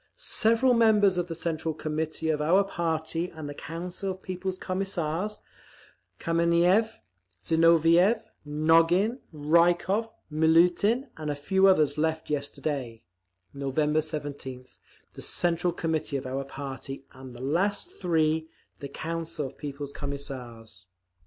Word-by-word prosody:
Several 245 - +2
members 210 -5 +4
of 175 - -2
the 165 - -5
Central 160 -1 -2
Committee 155 +1 -3
of 150 -1 +1
our 180 +6 +4
party 165 -2 -2
and 160 -3 -8
the 145 - -5
Council 175 +6 -5
of 185 0 -6
People's 185 0 -4
Commissars, 185 +1 -2 0.8
Kameniev, 170 +6 +2 0.5
Zinoviev, 165 +5 +4 0.2
Nogin, 165 - +3
Rykov, 175 +8 +2 0.2
Miliutin 175 - +3
and 155 -1 -4
a 145 - -1
few 190 +7 +3
others 155 -5 +3
left 160 0 -1
yesterday, 140 -4 -3 0.5
November 150 +3 0
17th, 145 -5 -6 0.3
the - - -10
Central 175 0 +1
Committee 160 -4 -2
of 135 - -6
our 135 +1 -3
party, 135 0 -7
and 130 -1 -11
the 120 - -8
last 200 - -1
three, 160 -2 +1 0.3
the 140 - -6
Council 165 +1 -4
of 130 - -8
People's 140 -1 -6
Commissars…. 120 -8 -6
160 Hz, 120 wpm, -27 LUFS, 145-180 Hz, 0.8 s, members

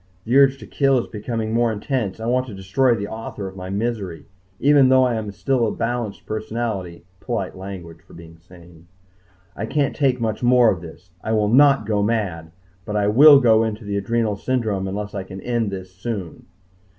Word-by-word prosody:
The 120 - 0
urge 135 -1 +5
to - - -11
kill 135 -2 +2
is 120 - -1
becoming 110 0 -4
more 120 0 +2
intense. 110 -2 -3
I 110 - -5
want 130 +2 0
to 110 - -8
destroy 115 +7 +1
the 100 -2 -4
author 110 -2 -6
of 95 - -10
my 95 -1 -7
misery. 100 -4 -3 0.3
Even 140 -2 +5
though 130 0 +5
I 125 -1 +1
am 110 -2 -3
still 125 +2 0
a - - -1
balanced 115 -3 -3
personality 110 -6 -4
polite 110 -6 -4
language 90 -4 -9
for 90 - -18
being 80 0 -13
sane 85 -1 -17 0.7
I 110 - -4
can't 145 0 0
take 135 -3 +1
much 110 -2 -2
more 125 -2 +5
of 85 - -4
this. 85 -2 -13
I 110 - -1
will 105 -1 +2
not 135 -1 +5
go 105 -1 0
mad, 100 -7 -2 0.3
but 105 - -5
I 105 -1 +2
will 140 +6 +8
go 115 -3 +4
into 110 0 -4
the 100 0 -3
adrenal 110 +1 0
syndrome 110 -5 -1
unless 105 +2 -5
I 100 - -3
can 95 0 -9
end 115 0 -1
this 95 -1 -8
soon. 95 -3 -6
110 Hz, 200 wpm, -21 LUFS, 95-120 Hz, 0.7 s, will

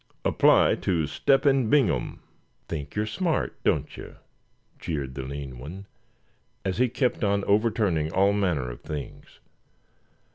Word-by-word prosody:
Apply - - +4
to 85 -4 0
Step 135 - +2
hen 135 -5 +3
Bingham." 130 - +1 0.5
"Think 75 -3 -6
you're 105 +1 0
smart, 165 - -1
don't - - 0
you?" - - -10 0.6
jeered 70 -5 -4
the 70 - -5
lean 65 -1 -7
one, 90 +10 -8 0.8
as 95 +2 -2
he 125 0 +3
kept 125 0 -1
on 100 -1 +1
overturning 100 -7 +1
all 100 +3 +3
manner 85 -11 0
of - - -11
things. 75 -2 -8
95 Hz, 135 wpm, -26 LUFS, 75-110 Hz, 0.8 s, Apply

